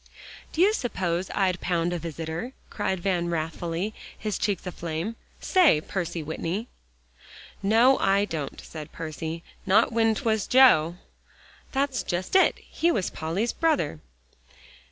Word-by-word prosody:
"Do 325 Hz, -, 0 dB
you 405 Hz, +3 st, +5 dB
suppose 185 Hz, -, -2 dB
I'd 185 Hz, -2 st, +1 dB
pound 175 Hz, -1 st, 0 dB
a 175 Hz, -, -2 dB
visitor?" 165 Hz, -, -5 dB, 0.2 s
cried 190 Hz, -3 st, -2 dB
Van 175 Hz, -2 st, 0 dB
wrathfully, 165 Hz, +4 st, -2 dB, 0.2 s
his 215 Hz, -2 st, -3 dB
cheeks 205 Hz, -2 st, -1 dB
aflame. 170 Hz, +4 st, -4 dB, 0.2 s
"Say, 360 Hz, -, +4 dB
Percy 170 Hz, -1 st, -4 dB
Whitney?" 170 Hz, +8 st, -3 dB, 0.9 s
"No, 230 Hz, +7 st, +5 dB
I 195 Hz, +1 st, +3 dB
don't," 155 Hz, -7 st, -5 dB
said 155 Hz, -2 st, -9 dB
Percy, 160 Hz, +1 st, -5 dB, 0.2 s
"not 210 Hz, +5 st, +4 dB
when 225 Hz, -1 st, +3 dB
'twas 220 Hz, -4 st, 0 dB
Joe." 175 Hz, -11 st, +6 dB, 0.8 s
"That's 270 Hz, -2 st, 0 dB
just 180 Hz, -, -3 dB
it. 380 Hz, -, +5 dB
He 340 Hz, +1 st, 0 dB
was 195 Hz, -, -1 dB
Polly's 170 Hz, +9 st, -2 dB
brother." 310 Hz, -, +1 dB
185 Hz, 130 wpm, -26 LUFS, 165-225 Hz, 0.9 s, Joe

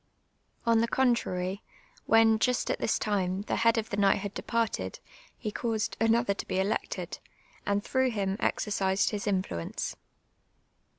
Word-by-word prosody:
On 230 Hz, -1 st, +4 dB
the 230 Hz, -, +2 dB
contrary, 200 Hz, -7 st, 0 dB, 0.5 s
when, 225 Hz, -1 st, +5 dB
just 250 Hz, +1 st, +1 dB
at -, -, -2 dB
this -, -, +1 dB
time, 190 Hz, -3 st, 0 dB
the -, -, -2 dB
head 230 Hz, 0 st, +4 dB
of 220 Hz, -1 st, -2 dB
the 200 Hz, -, -2 dB
knighthood 200 Hz, 0 st, +2 dB
departed, 220 Hz, -, -2 dB, 0.4 s
he 215 Hz, -, -4 dB
caused 225 Hz, -1 st, -2 dB
another 225 Hz, -1 st, +3 dB
to -, -, -7 dB
be 185 Hz, -, -1 dB
elected, 195 Hz, +3 st, -2 dB, 0.5 s
and 200 Hz, 0 st, +1 dB
tlirough 260 Hz, -1 st, +1 dB
him 195 Hz, -4 st, -1 dB
exercised 195 Hz, -2 st, +1 dB
his 205 Hz, -2 st, -3 dB
inllucnce. 185 Hz, -, -2 dB
210 Hz, 140 wpm, -29 LUFS, 195-230 Hz, 0.5 s, when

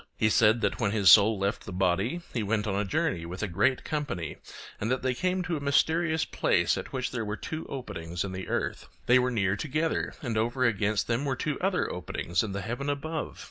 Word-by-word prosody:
He 110 Hz, 0 st, +2 dB
said 110 Hz, +2 st, +4 dB
that -, -, 0 dB
when 110 Hz, -, +1 dB
his 100 Hz, -3 st, +5 dB
soul 110 Hz, +1 st, +7 dB
left 100 Hz, +5 st, -2 dB
the -, -, -5 dB
body 95 Hz, -, 0 dB
he 115 Hz, -, -1 dB
went 105 Hz, +1 st, 0 dB
on 105 Hz, -, -1 dB
a 100 Hz, +1 st, +1 dB
journey 90 Hz, -3 st, -1 dB
with 90 Hz, +4 st, -6 dB
a -, -, 0 dB
great 125 Hz, +9 st, +1 dB
company, 145 Hz, -, -3 dB, 0.4 s
and 110 Hz, -, -2 dB
that 130 Hz, 0 st, 0 dB
they 130 Hz, -1 st, +1 dB
came 185 Hz, +6 st, 0 dB
to 175 Hz, -2 st, -2 dB
a -, -, -4 dB
mysterious 160 Hz, +3 st, +2 dB
place -, -, +2 dB
at -, -, -6 dB
which 130 Hz, -1 st, -2 dB
there 115 Hz, -2 st, -2 dB
were 105 Hz, 0 st, -4 dB
two 160 Hz, 0 st, -6 dB
openings 85 Hz, -10 st, -5 dB
in 100 Hz, -, -4 dB
the 95 Hz, 0 st, -6 dB
earth; -, -, -2 dB, 0.2 s
they 125 Hz, +1 st, +6 dB
were 125 Hz, 0 st, +1 dB
near 100 Hz, -5 st, +1 dB
together, 155 Hz, +8 st, -1 dB
and 115 Hz, -4 st, -1 dB
over 120 Hz, +3 st, +1 dB
against 105 Hz, -2 st, +1 dB
them 120 Hz, +3 st, 0 dB
were 135 Hz, -2 st, 0 dB
two 150 Hz, +3 st, -2 dB
other 190 Hz, 0 st, +1 dB
openings 85 Hz, 0 st, -2 dB
in 110 Hz, -, -3 dB
the 100 Hz, +1 st, -3 dB
heaven 120 Hz, +6 st, -3 dB
above. 150 Hz, +2 st, -3 dB
115 Hz, 225 wpm, -28 LUFS, 100-140 Hz, 0.4 s, soul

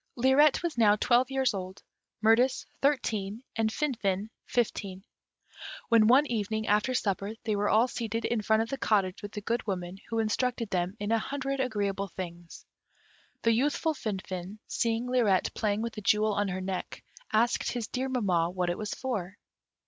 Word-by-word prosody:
Lirette 265 Hz, +6 st, +4 dB
was 330 Hz, -8 st, -2 dB
now 210 Hz, -2 st, +6 dB
twelve 245 Hz, +4 st, +3 dB
years 265 Hz, -3 st, +1 dB
old, 185 Hz, -1 st, -6 dB, 0.4 s
Mirtis 245 Hz, +4 st, +4 dB, 0.2 s
thirteen, 225 Hz, -6 st, 0 dB
and 225 Hz, -1 st, +1 dB
Finfin 220 Hz, -7 st, -1 dB, 0.2 s
fifteen, 200 Hz, -5 st, -1 dB, 0.9 s
when 225 Hz, -2 st, +6 dB
one 265 Hz, +5 st, +6 dB
evening, 220 Hz, -3 st, -2 dB
after 210 Hz, +5 st, +2 dB
supper, 200 Hz, -2 st, -1 dB
they 220 Hz, -2 st, 0 dB
were 205 Hz, 0 st, +1 dB
all 225 Hz, +3 st, +4 dB
seated 230 Hz, -2 st, -3 dB
in 235 Hz, -2 st, 0 dB
front 220 Hz, +1 st, +3 dB
of 225 Hz, -, -8 dB
the 275 Hz, -, -4 dB
cottage 195 Hz, -5 st, +1 dB
with 205 Hz, -, -7 dB
the 210 Hz, -, -5 dB
Good 230 Hz, +2 st, -2 dB
Woman, 180 Hz, -1 st, -4 dB
who 230 Hz, -, -2 dB
instructed 225 Hz, +1 st, 0 dB
them 180 Hz, +3 st, -1 dB
in 205 Hz, +1 st, -2 dB
a 230 Hz, -, +3 dB
hundred 275 Hz, +3 st, -3 dB
agreeable 200 Hz, -6 st, -1 dB
things. 175 Hz, -2 st, -8 dB, 0.8 s
The 230 Hz, -, +4 dB
youthful 290 Hz, +6 st, +1 dB
Finfin, 190 Hz, -5 st, -5 dB
seeing 230 Hz, +1 st, -1 dB
Lirette 230 Hz, -7 st, +2 dB
playing 210 Hz, 0 st, 0 dB
with 230 Hz, -1 st, -3 dB
the 215 Hz, -, -7 dB
jewel 210 Hz, +1 st, +3 dB
on 205 Hz, 0 st, 0 dB
her 185 Hz, 0 st, -3 dB
neck, 185 Hz, 0 st, -5 dB, 0.3 s
asked 235 Hz, +3 st, +2 dB
his 240 Hz, -3 st, -3 dB
dear 260 Hz, +1 st, -2 dB
mamma 185 Hz, -10 st, +1 dB
what 180 Hz, -1 st, -1 dB
it 175 Hz, -, -5 dB
was 210 Hz, -1 st, -3 dB
for? 205 Hz, -7 st, -4 dB
220 Hz, 170 wpm, -29 LUFS, 200-245 Hz, 0.9 s, now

